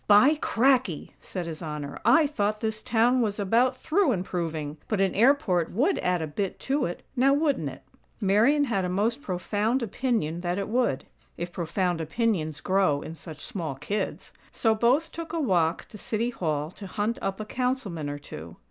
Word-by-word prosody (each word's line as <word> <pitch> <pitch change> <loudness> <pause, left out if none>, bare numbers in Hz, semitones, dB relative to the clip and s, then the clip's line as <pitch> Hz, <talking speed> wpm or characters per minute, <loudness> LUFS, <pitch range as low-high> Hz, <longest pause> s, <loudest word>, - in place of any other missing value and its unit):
"By 210 +8 +7
cracky!" 250 - +2
said 180 -3 -5
His 165 0 -6
Honor. 150 -3 -5
"I 325 -1 +6
thought 215 -7 -1
this 220 -1 -2
town 240 +3 +3
was 210 -2 -1
about 235 +6 +2
through 320 -2 +2
improving. 165 -5 -3
But 215 - -1
an 195 -2 +2
airport 220 - +3
would 290 - +2
add 180 -2 0
a - - 0
bit 180 +6 -3
to 280 +2 0
it; 175 - -6
now 270 +2 +4
wouldn't 285 - +1
it?" 135 - -11 0.4
Marian 225 +9 +4
had 215 -8 0
a 180 - -1
most 220 +8 0
profound 210 +5 -1
opinion 215 - -1
that 175 0 -1
it 200 - -3
would; 235 - +1 0.3
(if 175 +1 -4
profound 175 0 -1
opinions 160 -3 -1
grow 185 -7 +2
in 160 - -7
such 160 -2 -10
small 170 - -4
kids!) 155 +10 -4 0.2
so 225 -2 +2
both 250 +9 +2
took 330 0 -7
a 335 - 0
walk 175 - +1
to 210 - -11
City 230 +4 -1
Hall 155 -6 -2
to 195 +1 -9
hunt 215 +6 -2
up 195 +1 -2
a 215 - -4
Councilman 220 - -2
or 145 - -4
two. 85 - -9
205 Hz, 185 wpm, -27 LUFS, 170-245 Hz, 0.4 s, By